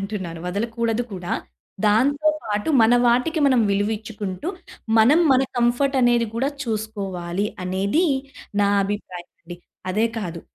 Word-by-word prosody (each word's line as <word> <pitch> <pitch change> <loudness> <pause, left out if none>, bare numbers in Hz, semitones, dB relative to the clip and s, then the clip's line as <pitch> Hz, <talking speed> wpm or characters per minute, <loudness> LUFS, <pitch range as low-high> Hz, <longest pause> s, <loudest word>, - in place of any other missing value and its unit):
అంటున్నాను. 190 -5 -5
వదలకూడదు 230 +4 -1
కూడా. 180 -2 -5 0.5
దాంతో 285 +8 +3 0.2
పాటు 210 +6 -2
మన 225 +2 +5
వాటికి 250 +7 +2
మనం 255 -3 +4
విలువిచ్చుకుంటూ, 210 - -3 0.5
మనం 280 +10 +6
మన 260 +1 +4
కంఫర్ట్ 245 +3 +2
అనేది 240 -1 +3
గూడా 265 +4 0 0.2
చూసుకోవాలి, 200 -4 -3 0.2
అనేది 195 - 0 0.6
నా 200 - +4 0.2
అభిప్రాయమండీ. 180 -3 -7 0.3
అదే 215 +4 +1
కాదు, 170 -5 -5
220 Hz, 115 wpm, -22 LUFS, 195-240 Hz, 0.6 s, మనం